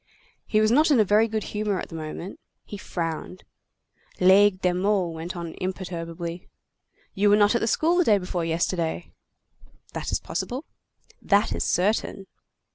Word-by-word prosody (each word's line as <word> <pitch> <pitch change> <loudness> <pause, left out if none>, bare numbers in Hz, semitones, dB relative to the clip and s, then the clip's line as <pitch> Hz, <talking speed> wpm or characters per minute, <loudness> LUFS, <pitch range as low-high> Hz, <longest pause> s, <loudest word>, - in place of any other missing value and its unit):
He 215 - +2
was 215 0 +3
not 300 +6 +4
in 280 -5 +4
a - - +6
very 210 +3 +4
good 220 -1 -2
humor 210 -2 -1
at - - -6
the 165 - -9
moment. 160 +4 -7 0.3
He - - -8
frowned. 175 -1 -5 0.8
Laigle 190 +1 +5
de 180 -1 +1
Meaux 190 0 +1
went 165 +2 -6
on 170 -2 -6
imperturbably:— 175 -2 -5 0.6
"You 205 +2 +2
were 205 - +6
not 205 +1 +4
at 235 - +1
the 225 - 0
school 335 +9 +2
day 210 -9 +4
before 180 -2 -3
yesterday." 165 +1 -2 0.8
"That - - -4
is - - 0
possible." 260 +5 -4 0.6
"That 205 +1 +2
is - - -2
certain." 195 +1 0
190 Hz, 160 wpm, -25 LUFS, 175-210 Hz, 0.8 s, a